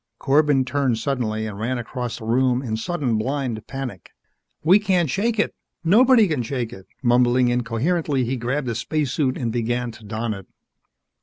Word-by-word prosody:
Corbin 140 -1 +3
turned 130 -3 0
suddenly 110 -4 -1
and 105 -2 -6
ran 120 +4 -1
across 120 0 -4
the 110 - -9
room 125 +2 +2
in 110 -4 -2
sudden, 120 -2 -1
blind 125 -2 -2
panic. 135 -10 -6 0.5
"We 180 +6 +6
can't 185 -5 +2
shake 225 +6 0
it! 215 - +1 0.3
Nobody 230 +5 +6
can 155 -7 -1
shake 120 -1 -3
one!" 95 -3 -11 0.2
Mumbling 125 0 +4
incoherently, 130 +5 0
he 130 +3 -1
grabbed 130 +3 -2
a - - -1
spacesuit 135 +2 -1
and 120 -3 -2
began 120 +1 -1
to 115 - -15
don 110 +1 -3
it. 95 -2 -10
125 Hz, 165 wpm, -22 LUFS, 115-145 Hz, 0.5 s, We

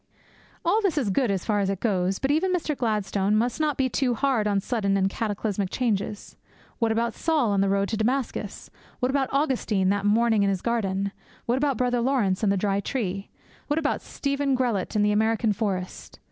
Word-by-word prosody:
All 440 - +3
this 385 -7 0
is 240 -9 +1
good, 245 +4 +1
as 195 -3 -1
far 210 -2 +1
as 195 -1 0
it 195 -2 -2
goes. 190 -4 0
But 270 - 0
even 345 +5 +2
Mr. 330 -4 -1
Gladstone 210 -4 0
must 235 +6 0
not 305 -2 0
be 265 - +2
too 255 -1 0
hard 250 -4 +1
on 200 -1 +2
sudden 200 -2 0
and 190 0 +2
cataclysmic 205 -1 -2
changes. 210 -4 -2 0.4
What 230 -1 +2
about 230 +1 0
Saul 305 -9 +1
on 200 -1 +2
the 195 - +2
road 200 0 +1
to 220 - -1
Damascus? 225 -2 -2 0.3
What 250 0 +1
about 270 -1 0
Augustine 245 -9 +1
that 200 0 +1
morning 220 0 +3
in 200 - +3
his 190 -2 -2
garden? 200 -4 -1 0.3
What 245 +2 +1
about 280 -3 +1
Brother 245 0 +1
Laurence 230 -7 +1
and 210 -3 +2
the 200 - +1
dry 195 +1 0
tree? 200 -3 -3 0.4
What 295 - 0
about 305 -2 0
Stephen 280 -1 -1
Grellet 235 -6 -1
in 210 - +3
the 210 - +3
American 220 +1 +2
forest? 190 -4 -4
220 Hz, 200 wpm, -25 LUFS, 200-260 Hz, 0.4 s, All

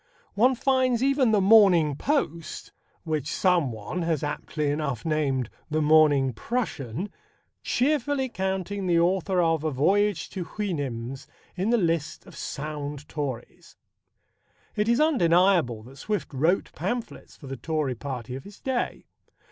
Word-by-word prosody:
One 250 +5 +4
finds 255 -1 +2
even 270 -3 +3
the 210 - +4
Morning 190 -7 +6
Post 170 - -2 0.3
which 155 -4 -2
someone 170 - 0
has 165 -3 -1
aptly 150 0 -2
enough 145 -4 -3
named 140 -6 0 0.2
the 155 0 0
Morning 150 -4 +4
Prussian 175 - -3 0.5
cheerfully 280 0 +1
counting 190 -2 -3
the 170 -1 +3
author 185 +2 +1
of 165 -2 +1
A 155 - +1
Voyage 190 +6 +1
to 185 - -4
Houyhnhnms 135 - -4 0.3
in 190 +4 -1
the 240 - +4
list 165 -5 -1
of 185 - -14
sound 150 -1 -5
Tories. 140 -6 -6 1.0
It 210 +2 +1
is 235 - +3
undeniable 175 - +3
that 130 +4 -14
Swift 210 -4 -3
wrote 160 +8 +1
pamphlets 220 +9 -5
for 145 - -13
the 135 0 -5
Tory 150 +1 -2
Party 125 -1 -6
of 135 - -7
his 200 0 -13
day. 260 -2 -2
165 Hz, 135 wpm, -26 LUFS, 145-205 Hz, 1.0 s, Morning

